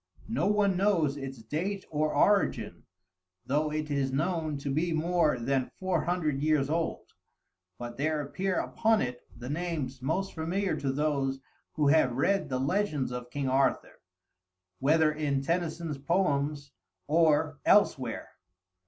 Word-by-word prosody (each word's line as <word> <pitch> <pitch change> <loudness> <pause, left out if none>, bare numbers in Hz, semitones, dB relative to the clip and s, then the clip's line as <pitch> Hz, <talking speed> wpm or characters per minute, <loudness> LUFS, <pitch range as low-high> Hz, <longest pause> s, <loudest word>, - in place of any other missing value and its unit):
No 215 - +1
one 205 -2 +2
knows 180 -8 +2
its 135 -4 -7
date 185 - -3
or 155 0 +1
origin, 190 - +2 0.6
though 150 +3 0
it 155 -1 -3
is 140 -2 0
known 155 +1 -1
to 140 0 -4
be 165 +4 0
more 160 -2 +2
than 130 +2 0
four 185 -3 0
hundred 155 -5 0
years 150 -2 +2
old, 165 0 -2 0.6
but 120 0 -7
there 155 +2 0
appear 185 +6 -2
upon 225 -1 +1
it 125 0 -5 0.2
the 120 +1 -8
names 145 -4 -3
most 185 +9 -1
familiar 180 +4 -1
to 135 -1 -1
those 135 -2 0 0.3
who 150 -2 +2
have 145 -5 +4
read 195 +7 +1
the 130 - -1
legends 145 -1 0
of 125 0 -6
King 140 +2 -3
Arthur, 135 +1 0 0.8
whether 155 +3 +4
in 145 -3 -1
Tennyson's 165 -2 -2
poems 145 -3 0 0.3
or 155 -1 +2
elsewhere. - - +2
150 Hz, 140 wpm, -29 LUFS, 135-170 Hz, 0.8 s, have